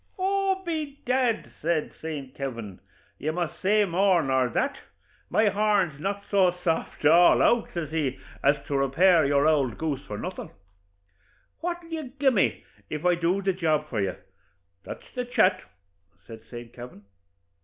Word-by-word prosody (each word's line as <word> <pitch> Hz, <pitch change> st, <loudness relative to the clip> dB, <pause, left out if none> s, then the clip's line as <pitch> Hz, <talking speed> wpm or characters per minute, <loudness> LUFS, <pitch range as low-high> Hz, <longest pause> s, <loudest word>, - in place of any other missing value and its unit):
'Oh, 385 Hz, 0 st, 0 dB
by 310 Hz, -4 st, -3 dB
dad,' 250 Hz, -3 st, 0 dB
says 160 Hz, -1 st, 0 dB
St. 145 Hz, -5 st, -6 dB
Kavin, 115 Hz, -8 st, -6 dB, 0.4 s
'you 155 Hz, -, -1 dB
must 175 Hz, -1 st, -4 dB
say 210 Hz, +2 st, +3 dB
more 185 Hz, -1 st, +2 dB
nor 130 Hz, -2 st, +1 dB
that 280 Hz, -, -1 dB, 0.5 s
my 215 Hz, -1 st, +3 dB
horn's 200 Hz, -7 st, +1 dB
not 200 Hz, +4 st, -3 dB
so 185 Hz, -3 st, +3 dB
soft 160 Hz, -2 st, -2 dB
all 170 Hz, +4 st, +6 dB
out,' 240 Hz, -1 st, +3 dB
says 160 Hz, -4 st, -3 dB
he, 145 Hz, -5 st, -1 dB, 0.3 s
'as 140 Hz, +1 st, +5 dB
to 145 Hz, -, -3 dB
repair 160 Hz, +6 st, +4 dB
your 140 Hz, 0 st, +3 dB
ould 145 Hz, -6 st, +2 dB
goose 145 Hz, -4 st, -3 dB
for 105 Hz, -, -5 dB
nothin'; 180 Hz, -, -6 dB, 1.1 s
what'll 345 Hz, 0 st, -4 dB
you 310 Hz, -6 st, -5 dB
gi' 270 Hz, -1 st, +4 dB
me 210 Hz, -7 st, +1 dB, 0.3 s
if 150 Hz, +2 st, -5 dB
I 180 Hz, -, +5 dB
do 175 Hz, +3 st, 0 dB
the 195 Hz, 0 st, +1 dB
job 155 Hz, -4 st, 0 dB
for 110 Hz, -5 st, -1 dB
you? 95 Hz, -2 st, -1 dB, 0.7 s
that's -, -, -9 dB
the 250 Hz, -, -2 dB
chat,' 240 Hz, -6 st, +2 dB, 0.6 s
says 115 Hz, -1 st, -10 dB
St. 120 Hz, -1 st, -9 dB
Kavin. 120 Hz, -4 st, -11 dB
170 Hz, 155 wpm, -26 LUFS, 140-210 Hz, 1.1 s, all